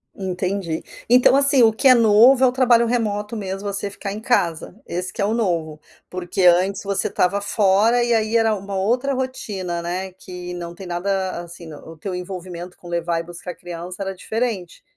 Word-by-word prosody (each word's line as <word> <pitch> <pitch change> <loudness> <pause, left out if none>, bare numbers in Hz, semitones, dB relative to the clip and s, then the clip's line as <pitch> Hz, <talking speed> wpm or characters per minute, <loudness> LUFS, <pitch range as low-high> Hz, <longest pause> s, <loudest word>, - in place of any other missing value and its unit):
Entendi. 185 -2 -3 0.3
Então, 250 +2 +6
assim, 280 -3 +4
o 220 - +6
que 265 +5 +2
é 255 - +9
novo 235 +4 +6
é - - +7
o - - +2
trabalho 245 -2 +4
remoto 215 -2 -1
mesmo, 195 0 -4
você 200 0 -3
ficar 200 0 -6
em 210 - -5
casa, 175 -7 0
esse 180 +2 -4
que 215 - -4
é - - +2
o 215 - 0
novo, 165 -9 -1 0.3
porque 180 +1 -3
antes 185 +3 +4
você 200 -1 -1
estava 200 0 +1
fora, 210 +4 +3
e 240 -1 +1
aí 220 0 +1
era 225 -1 +3
uma 200 -1 -5
outra 245 +8 +1
rotina, 200 -9 -4
né, 185 +2 -4
que 180 -1 -9
não 170 0 -7
tem 190 - -10
nada, 185 +1 -2
assim, 170 -1 -11
o 160 +2 -11
teu 190 +3 -5
envolvimento 180 -1 -7
com 175 - -12
levar 170 -1 -1
e - - -9
buscar 175 +1 -8
criança 175 +2 -7
era 195 0 -4
diferente, 220 -3 -4
195 Hz, 195 wpm, -21 LUFS, 175-225 Hz, 0.3 s, é